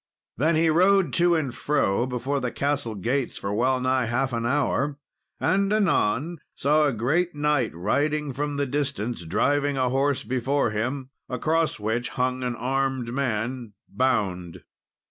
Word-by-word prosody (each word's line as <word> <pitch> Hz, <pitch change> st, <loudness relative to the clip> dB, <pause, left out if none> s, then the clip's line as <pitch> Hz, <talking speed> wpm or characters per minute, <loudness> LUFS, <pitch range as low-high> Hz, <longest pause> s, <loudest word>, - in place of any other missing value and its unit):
Then 155 Hz, +7 st, +2 dB
he 160 Hz, 0 st, +3 dB
rode 190 Hz, +3 st, +4 dB
to 175 Hz, 0 st, +4 dB
and 145 Hz, -6 st, -1 dB
fro 125 Hz, -5 st, 0 dB
before 130 Hz, +3 st, -2 dB
the 125 Hz, -2 st, -2 dB
castle 140 Hz, -5 st, -1 dB
gates 120 Hz, +7 st, -1 dB
for 100 Hz, +1 st, -3 dB
well 130 Hz, +4 st, +2 dB
nigh 130 Hz, -1 st, +1 dB
half 125 Hz, +2 st, -1 dB
an 115 Hz, 0 st, -1 dB
hour, 140 Hz, +1 st, 0 dB, 0.4 s
and 195 Hz, +1 st, +1 dB
anon 170 Hz, -, +1 dB, 0.2 s
saw 150 Hz, +2 st, +3 dB
a -, -, +1 dB
great 150 Hz, +10 st, 0 dB
knight 145 Hz, -5 st, +1 dB
riding 145 Hz, -, 0 dB
from 145 Hz, +2 st, -2 dB
the 140 Hz, 0 st, 0 dB
distance, 130 Hz, -7 st, -2 dB
driving 145 Hz, -, +1 dB
a 130 Hz, -1 st, +1 dB
horse 135 Hz, +2 st, +1 dB
before 130 Hz, +2 st, 0 dB
him, 130 Hz, +5 st, -3 dB, 0.2 s
across 160 Hz, +5 st, 0 dB
which 110 Hz, +3 st, -1 dB
hung 130 Hz, 0 st, -1 dB
an 125 Hz, -1 st, -2 dB
armed 130 Hz, -1 st, -1 dB
man 120 Hz, -3 st, -2 dB
bound. 95 Hz, -10 st, -1 dB
130 Hz, 150 wpm, -25 LUFS, 120-145 Hz, 0.4 s, rode